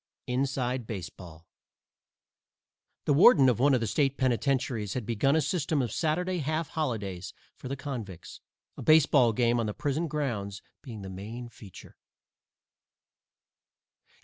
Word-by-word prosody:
_ -, -, -65 dB, 0.2 s
"INSIDE" 125 Hz, -2 st, -1 dB
BASEBALL 85 Hz, -5 st, -8 dB, 1.6 s
(_The 145 Hz, -, +3 dB
warden 145 Hz, -, +7 dB
of 120 Hz, -, 0 dB
one 140 Hz, +1 st, +4 dB
of 125 Hz, -, 0 dB
the -, -, 0 dB
State 135 Hz, +5 st, 0 dB
penitentiaries 125 Hz, -4 st, 0 dB
has 125 Hz, -, -2 dB
begun 120 Hz, +6 st, +1 dB
a 160 Hz, -, +3 dB
system 155 Hz, -2 st, -1 dB
of 120 Hz, -5 st, -1 dB
Saturday 175 Hz, +7 st, -1 dB
half 155 Hz, +1 st, -2 dB
holidays 100 Hz, -, -4 dB, 0.2 s
for -, -, -9 dB
the 135 Hz, -, -3 dB
convicts, 115 Hz, -, -7 dB, 0.3 s
a -, -, -8 dB
baseball 145 Hz, -6 st, +5 dB
game 120 Hz, +1 st, +1 dB
on 115 Hz, -, -1 dB
the 105 Hz, -, -4 dB
prison 150 Hz, +4 st, -1 dB
grounds 115 Hz, -10 st, -3 dB, 0.2 s
being 110 Hz, -6 st, -9 dB
the 95 Hz, -, -7 dB
main 110 Hz, +6 st, -7 dB
feature. 100 Hz, -5 st, -14 dB
125 Hz, 140 wpm, -28 LUFS, 105-145 Hz, 1.6 s, warden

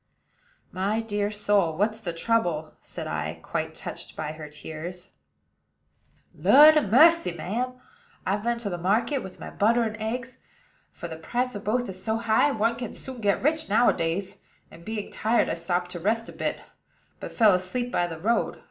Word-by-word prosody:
"My 200 Hz, +4 st, 0 dB
dear 205 Hz, -2 st, -1 dB
soul, 205 Hz, -6 st, +1 dB
what's 215 Hz, +3 st, +1 dB
the 190 Hz, -6 st, -4 dB
trouble?" 165 Hz, -4 st, 0 dB
said -, -, -7 dB
I, 80 Hz, +1 st, -3 dB
quite -, -, -3 dB
touched -, -, -8 dB
by 155 Hz, -1 st, -4 dB
her 155 Hz, -1 st, -9 dB
tears. 160 Hz, +4 st, -7 dB, 1.2 s
"Lud 300 Hz, +3 st, +8 dB
a 305 Hz, -, +5 dB
mercy, 310 Hz, -, +5 dB
ma'am! 225 Hz, +10 st, -3 dB, 0.5 s
I've 200 Hz, +2 st, 0 dB
been 235 Hz, +2 st, 0 dB
to 205 Hz, -6 st, -4 dB
market 220 Hz, -, +1 dB
with 190 Hz, -6 st, -9 dB
my -, -, -8 dB
butter 235 Hz, +3 st, +3 dB
and 220 Hz, -1 st, -2 dB
eggs, 240 Hz, +3 st, -4 dB, 0.5 s
for -, -, -7 dB
the 160 Hz, -1 st, -7 dB
price 245 Hz, +9 st, -2 dB
of 205 Hz, -, -7 dB
both 245 Hz, +4 st, 0 dB
is 185 Hz, -1 st, -8 dB
so 220 Hz, +2 st, 0 dB
high, 230 Hz, +5 st, +3 dB
one 230 Hz, -2 st, 0 dB
can 240 Hz, -2 st, -6 dB
soon 260 Hz, -3 st, -9 dB
get 200 Hz, +1 st, +1 dB
rich 310 Hz, 0 st, +1 dB
nowadays, 195 Hz, -4 st, +1 dB, 0.3 s
and, 170 Hz, -, -14 dB
being 215 Hz, +1 st, -5 dB
tired, 225 Hz, +2 st, +1 dB
I -, -, 0 dB
stopped 175 Hz, +1 st, -2 dB
to 175 Hz, -, -5 dB
rest 225 Hz, +6 st, 0 dB
a -, -, -9 dB
bit, -, -, -3 dB, 0.6 s
but -, -, -7 dB
fell 220 Hz, -4 st, +5 dB
asleep 240 Hz, +7 st, -2 dB
by 175 Hz, -, +1 dB
the 165 Hz, -2 st, -6 dB
road. 225 Hz, +8 st, 0 dB
210 Hz, 175 wpm, -26 LUFS, 175-235 Hz, 1.2 s, Lud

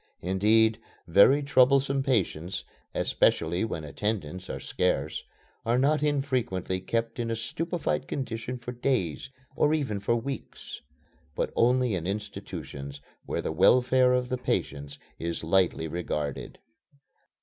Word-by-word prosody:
Indeed, 105 Hz, +4 st, +3 dB, 0.3 s
very 130 Hz, -, +6 dB
troublesome 135 Hz, 0 st, +4 dB
patients 95 Hz, -, -1 dB, 0.3 s
(especially 85 Hz, +4 st, +2 dB
when 95 Hz, -8 st, -3 dB
attendants 90 Hz, +3 st, -3 dB
are -, -, -4 dB
scarce) 75 Hz, +3 st, -1 dB, 0.4 s
are 115 Hz, +2 st, +2 dB
not 145 Hz, +4 st, +3 dB
infrequently 130 Hz, -, 0 dB
kept 115 Hz, +5 st, -2 dB
in 115 Hz, -1 st, -1 dB
a 115 Hz, -, 0 dB
stupefied 165 Hz, +9 st, -2 dB
condition 125 Hz, -2 st, -4 dB
for 125 Hz, 0 st, -7 dB
days, 120 Hz, -, -1 dB, 0.3 s
or 150 Hz, +1 st, +3 dB
even 130 Hz, -10 st, -2 dB
for 105 Hz, +4 st, +1 dB
weeks 135 Hz, +4 st, -6 dB, 0.5 s
but -, -, -2 dB
only 125 Hz, -1 st, +3 dB
in 90 Hz, -2 st, -2 dB
institutions 70 Hz, -8 st, -6 dB, 0.3 s
where -, -, -2 dB
the -, -, -2 dB
welfare 125 Hz, +8 st, +4 dB
of 125 Hz, 0 st, 0 dB
the 125 Hz, -, -2 dB
patients 70 Hz, -, -2 dB, 0.2 s
is 85 Hz, 0 st, -3 dB
lightly 85 Hz, -1 st, +2 dB
regarded. 75 Hz, -4 st, -4 dB
115 Hz, 125 wpm, -28 LUFS, 90-130 Hz, 0.5 s, very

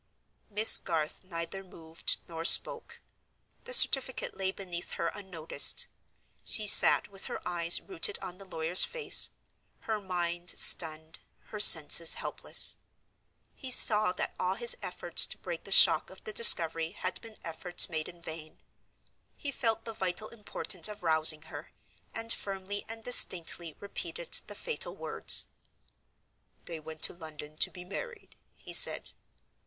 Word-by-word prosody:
Miss 215 Hz, +1 st, +4 dB
Garth 155 Hz, 0 st, -5 dB
neither 185 Hz, +1 st, -8 dB
moved 165 Hz, -3 st, -6 dB
nor 165 Hz, -1 st, -8 dB
spoke. -, -, +4 dB, 0.6 s
The -, -, -9 dB
certificate 265 Hz, -, +3 dB
lay 190 Hz, -1 st, -3 dB
beneath 180 Hz, -3 st, -7 dB
her 170 Hz, -, -3 dB
unnoticed. 185 Hz, -6 st, 0 dB, 0.6 s
She 215 Hz, -, -2 dB
sat 205 Hz, -, +5 dB
with 195 Hz, -1 st, -6 dB
her -, -, -6 dB
eyes 170 Hz, -1 st, +2 dB
rooted 390 Hz, +2 st, 0 dB
on 180 Hz, +1 st, -10 dB
the 195 Hz, -, -12 dB
lawyer's 175 Hz, -1 st, +2 dB
face; 475 Hz, -3 st, +3 dB, 0.5 s
her 220 Hz, -2 st, -5 dB
mind 175 Hz, -2 st, -5 dB
stunned, 160 Hz, -1 st, +1 dB, 0.3 s
her 210 Hz, -, -8 dB
senses 165 Hz, -3 st, +4 dB
helpless. -, -, 0 dB, 0.8 s
He 265 Hz, -, -10 dB
saw 215 Hz, -5 st, +4 dB
that -, -, -5 dB
all 185 Hz, +1 st, -2 dB
his 235 Hz, +2 st, +2 dB
efforts 175 Hz, -1 st, -1 dB
to -, -, -6 dB
break 170 Hz, -2 st, -8 dB
the 195 Hz, -, -10 dB
shock 165 Hz, -4 st, +5 dB
of 190 Hz, -, -11 dB
the 215 Hz, -, -8 dB
discovery 165 Hz, -6 st, +3 dB
had 185 Hz, -2 st, -5 dB
been 225 Hz, -2 st, -13 dB
efforts 175 Hz, +2 st, -2 dB
made 160 Hz, -2 st, -5 dB
in 170 Hz, -1 st, -17 dB
vain; 155 Hz, -1 st, -9 dB, 0.8 s
he 285 Hz, -, -6 dB
felt 225 Hz, -4 st, -3 dB
the 225 Hz, -, -6 dB
vital 190 Hz, +1 st, -5 dB
importance 205 Hz, -5 st, -2 dB
of 210 Hz, -3 st, -11 dB
rousing 160 Hz, -1 st, +2 dB
her, 145 Hz, -2 st, -12 dB, 0.4 s
and 230 Hz, 0 st, -1 dB
firmly 195 Hz, +1 st, -7 dB
and 225 Hz, 0 st, -10 dB
distinctly 175 Hz, -8 st, +2 dB
repeated 480 Hz, -, -8 dB, 0.2 s
the -, -, -10 dB
fatal 475 Hz, -2 st, -5 dB
words. -, -, +4 dB, 1.2 s
"They 165 Hz, -2 st, -9 dB
went 155 Hz, 0 st, -11 dB
to -, -, +3 dB
London 155 Hz, -3 st, -12 dB
to -, -, 0 dB
be 180 Hz, -1 st, -13 dB
married," 475 Hz, -, -10 dB, 0.2 s
he -, -, -11 dB
said. -, -, +4 dB
180 Hz, 145 wpm, -28 LUFS, 165-210 Hz, 1.2 s, sat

